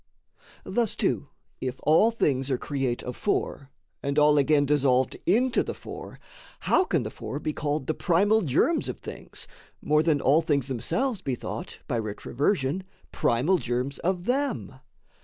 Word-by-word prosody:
Thus 235 -4 0
too, - - 0 0.3
if 130 0 -4
all 160 +9 +5
things 140 - 0
are 130 - +1
create 135 -3 -2
of 125 - -5
four, 140 -8 -2 0.3
And 140 +1 -2
all 150 0 +5
again 145 0 +3
dissolved 130 -3 +2
into 240 +7 +3
the - - -4
four, - - -9 0.4
How 370 - +3
can 165 - +1
the 110 - -5
four 140 - -6
be 155 - -2
called 145 -1 -2
the 155 - 0
primal 200 +7 +3
germs 175 - +1
Of - - -4
things, - - -8 0.3
more 150 +1 +3
than 155 -2 +2
all 145 +4 +4
things 140 -4 0
themselves 210 - -1
be 130 - -2
thought, - - -6
By 120 - 0
retroversion, 135 - -1 0.3
primal 150 +11 +2
germs 125 +2 -2
of 180 0 -1
them? 275 +4 -1
145 Hz, 160 wpm, -26 LUFS, 130-185 Hz, 0.4 s, all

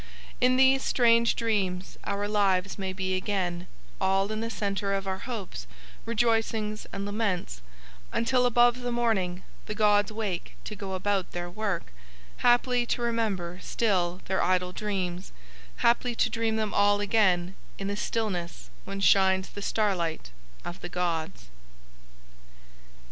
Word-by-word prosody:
In 255 0 +4
these 265 +1 +5
strange 235 -1 +4
dreams 190 -5 -1
our 200 +1 -1
lives 200 -2 +1
may 190 -1 -2
be 185 0 -2
again, 185 -2 -2 0.3
all 195 +2 +2
in 215 - -2
the 230 - -2
centre 200 -2 -2
of 195 0 -3
our 190 0 -2
hopes, 190 - -5 0.4
rejoicings 225 -2 0
and 195 - -4
laments, 200 - -2 0.5
until 250 +2 +2
above 240 +1 +4
the 245 0 -2
morning 195 -7 0 0.2
the 210 - -4
gods 205 -1 +3
wake 210 -5 -4
to 215 - -6
go 195 -2 -6
about 195 0 -1
their 175 0 -4
work, 195 - -3 0.4
haply 245 0 +3
to 240 - -1
remember 200 -7 -1
still 185 -6 0
Their 190 - 0
idle 180 0 +1
dreams, 185 -2 -3 0.4
haply 240 0 +2
to - - +1
dream 225 -1 0
them 215 -2 -1
all 205 0 +4
again 190 -4 +2 0.2
in 195 - -4
the 200 - -2
stillness 180 - -3
when 195 0 -5
shines 190 -1 +4
the 205 - -8
starlight 180 - -1 0.3
of 175 +1 -7
the - - -6
gods." 170 - -3
200 Hz, 140 wpm, -28 LUFS, 185-225 Hz, 0.5 s, these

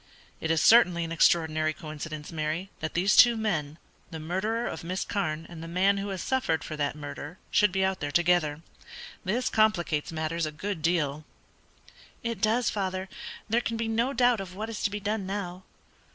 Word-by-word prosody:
"It 160 - -3
is 165 -1 +2
certainly 180 -7 +6
an 165 - -5
extraordinary 155 -1 +3
coincidence, 155 0 -7
Mary, 160 +4 -3
that 155 - -4
these 190 +4 +3
two 240 -2 +7
men 160 -9 -1 0.3
the 160 - -7
murderer 200 +9 -1
of - - -5
Miss 185 +3 -3
Carne 160 -5 -2
and 165 -2 -10
the 165 - -7
man 190 +4 +2
who 200 +1 -3
has 190 -2 -4
suffered 260 -12 0
for 155 - -5
that 145 -1 -1
murder 150 +3 -7
should 210 -3 +4
be 190 0 +1
out 190 0 -1
there 145 - -3
together. 170 -1 +2 0.6
This 235 +7 0
complicates 175 -9 +1
matters 160 0 -2
a - - -4
good 190 +3 -4
deal." 155 -3 0 1.0
"It 230 -1 -3
does, 230 +2 +2
father. 190 -2 -3 0.4
There 230 +3 +2
can 230 -1 -3
be 230 0 -1
no 230 +4 +1
doubt 245 -4 +3
of 185 -1 -8
what 220 +3 -4
is 215 - -5
to - - +1
be 205 +1 -4
done 205 -1 -2
now." 185 -2 -4
180 Hz, 190 wpm, -28 LUFS, 155-210 Hz, 1.0 s, two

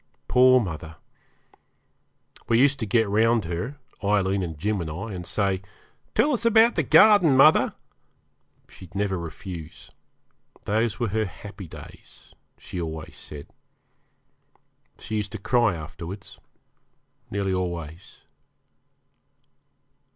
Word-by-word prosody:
Poor 130 0 +6
mother! 80 -6 -5 1.5
we 115 - +4
used 140 +1 +4
to 110 - -3
get 110 +1 +2
round 110 +1 +2
her 90 - -4 0.3
Aileen, 100 -1 +1
and 80 -4 -5
Jim, 105 +4 -1
and 80 - -4
I 100 +8 -6
and 90 -1 -7
say, 100 -2 0 0.5
'Tell 295 - +3
us 235 - -1
about 230 0 +5
the 160 - +1
garden, 160 - +6
mother.' 150 +4 +5 0.9
She'd 95 0 -15
never 100 -1 0
refuse; 85 0 -9 0.7
those 110 +2 0
were 120 -3 0
her 110 +2 0
happy 100 0 -10
days, - - -14 0.2
she 90 - -6
always 80 -1 -6
said. 70 -1 -9 1.5
She 110 - -4
used 105 0 -4
to - - -3
cry 110 -1 +2
afterwards 85 +4 -9 0.9
nearly 100 -1 -1
always. 85 -2 -5
100 Hz, 115 wpm, -25 LUFS, 85-120 Hz, 1.5 s, Poor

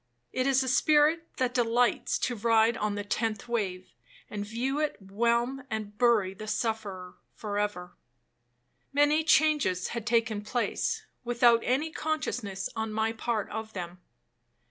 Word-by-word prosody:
It 255 +1 0
is 270 -1 +3
a - - -4
spirit 305 +5 +3
that 255 -1 0
delights 240 0 +2
to 245 - 0
ride 225 +1 +3
on 210 -2 -1
the 205 - -3
tenth 215 +2 -2
wave, 190 - -3 0.4
and 205 -1 -3
view 245 +7 -2
it 305 -1 0
whelm 235 +6 0
and 215 -2 -4
bury 215 -5 +3
the 215 +3 -9
sufferer 210 -5 -3 0.2
for 205 -2 -3
ever. 180 -4 -3 1.0
'Many 290 +2 +4
changes 300 - +3
had 235 -2 -5
taken 225 -3 +1
place, 245 - -1 0.2
without 240 -1 +4
any 285 +6 0
consciousness 250 -12 -3
on 220 0 -2
my 220 +1 0
part 225 -2 -2
of 220 0 -5
them. 180 -1 -7
230 Hz, 145 wpm, -29 LUFS, 205-255 Hz, 1.0 s, Many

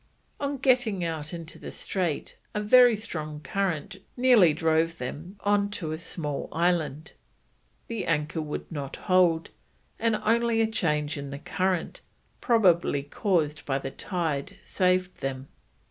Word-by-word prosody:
On 280 0 -2
getting 245 -8 +2
out 160 -2 -3
into 165 -2 -8
the - - -7
strait 175 -6 -2 0.2
a - - +1
very 245 +2 +7
strong 155 -8 -5
current 180 +2 -2 0.2
nearly 245 -9 +6
drove 160 +1 +1
them 160 +9 -6
on 205 0 +2
to 175 -6 -4
a 155 - -4
small 150 -4 -3
island, 160 -3 0 0.7
the 230 -3 -4
anchor 155 0 0
would 150 -1 -4
not 140 -4 -5
hold, 180 -4 +2 0.5
and 225 -1 +2
only 230 +1 +3
a 225 - +4
change 150 -9 -1
in 140 0 -6
the 140 - -5
current, 185 +3 -2 0.4
probably 180 - +3
caused 150 -1 0
by 135 -1 0
the 135 0 -5
tide, 160 -4 -3
saved 185 -1 +1
them. 135 0 -4
170 Hz, 140 wpm, -27 LUFS, 150-205 Hz, 0.7 s, very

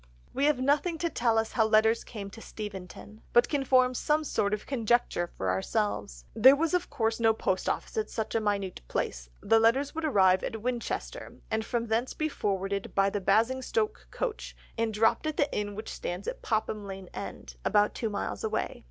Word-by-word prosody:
We 280 - +1
have 295 -3 +3
nothing 290 +6 +1
to 335 0 -1
tell 230 -2 +2
us 225 0 0
how 220 -2 +2
letters 220 +1 +4
came 200 -3 -8
to 225 - -11
Steventon, 210 0 -8
but 240 0 +6
can 285 -3 0
form 255 -1 +4
some 300 +5 +1
sort 205 -8 0
of 210 0 -2
conjecture 240 -7 +1
for 95 -1 0
ourselves. 95 -9 -2
There 260 +5 +8
was 330 +4 0
of 360 -1 0
course 225 0 -1
no 225 -1 +4
post 190 -3 -1
office - - -3
in 435 -1 0
such 220 -2 -4
a 225 - +1
minute 200 -3 -1
place; - - -3
the 225 +2 +5
letters 260 +6 +3
would 325 - -4
arrive 190 -10 +4
at 225 - -3
Winchester, 245 -1 -4
and 220 0 0
from 235 0 -2
thence 230 +3 -1
be 310 0 -1
forwarded 195 -5 -2
by 195 0 +3
the 205 - -2
Basingstoke 260 - +1
coach, - - -4 0.2
and 230 -1 0
dropped 225 +8 +2
at 310 - -3
the 290 - +1
inn 205 -1 -2
which 215 +2 -6
stands 180 +3 -5
at - - -4
Popham 215 -2 -1
Lane 190 -1 -8
End, - - -7
about 210 0 +3
two 225 - -2
miles 205 - -4
away. 220 - -2
225 Hz, 195 wpm, -29 LUFS, 200-260 Hz, 0.2 s, There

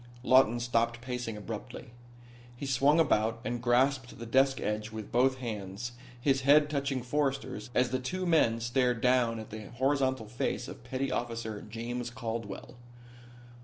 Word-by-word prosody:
Lawton 130 -3 +5
stopped 115 0 0
pacing 125 -3 -4
abruptly. 115 +2 -7 0.7
He 140 - -5
swung 140 +4 +3
about 115 -7 +2
and 120 -1 -2
grasped 125 +1 +2
the 115 - -7
desk 135 +3 +3
edge 105 +1 -2
with 110 -2 -7
both 130 +2 +3
hands, 110 -2 -5 0.3
his 135 +1 +2
head 145 +2 +5
touching 140 -3 -1
Forrester's 135 -4 -2
as 125 -1 +3
the 130 - 0
two 185 +9 -3
men 150 -10 +3
stared 120 0 +1
down 125 -2 +3
at 110 -1 -8
the 110 -1 -7
horizontal 130 -1 +1
face 125 +2 -2
of - - -10
petty 130 +2 -2
officer 115 -3 -3
James 120 +3 -5
Caldwell. 115 -3 -6
120 Hz, 150 wpm, -30 LUFS, 115-135 Hz, 0.7 s, Lawton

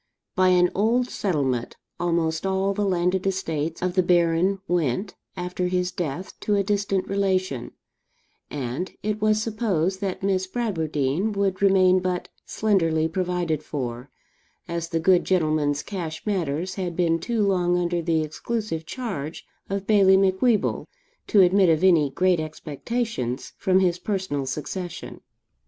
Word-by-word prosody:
By 185 -2 +4
an 180 -1 +4
old 235 +5 +1
settlement, 135 - -1 0.2
almost 165 -2 0
all 195 +1 0
the 205 +1 -1
landed 180 +1 +1
estates 165 -4 -2
of 180 -1 0
the 185 - +4
Baron 175 +2 +2
went, 175 - 0 0.2
after 180 0 -2
his 180 0 0
death, 175 +2 -4
to 210 - 0
a 200 - +2
distant 200 -1 0
relation; 190 -9 -1 0.8
and 140 +5 -4
it 215 0 -2
was 215 0 +3
supposed 195 -5 -1
that 195 -1 -3
Miss 190 -1 +1
Bradwardine 170 - -1
would 200 -2 -1
remain 185 -2 +5
but 180 -1 -2 0.2
slenderly 165 -7 +1
provided 175 -2 -1
for, 125 -3 -5 0.6
as 170 -1 -3
the 165 - 0
good 180 +2 +4
gentleman's 155 -5 +1
cash 170 -6 -6
matters 180 -3 -1
had 175 -2 -3
been 165 -2 +2
too 225 +3 0
long 180 -2 +2
under 175 -1 0
the 165 -1 +1
exclusive 165 +1 -4
charge 180 - -5 0.2
of 195 0 -2
Bailie 195 -3 +5
Macwheeble 195 +3 +2 0.4
to 205 - +5
admit 185 0 +5
of 160 +1 +2
any 165 -6 +5
great 180 +5 +2
expectations 155 - -4
from 185 0 +2
his 180 -1 +1
personal 185 -10 -2
succession. 175 +5 -5
180 Hz, 140 wpm, -24 LUFS, 160-195 Hz, 0.8 s, remain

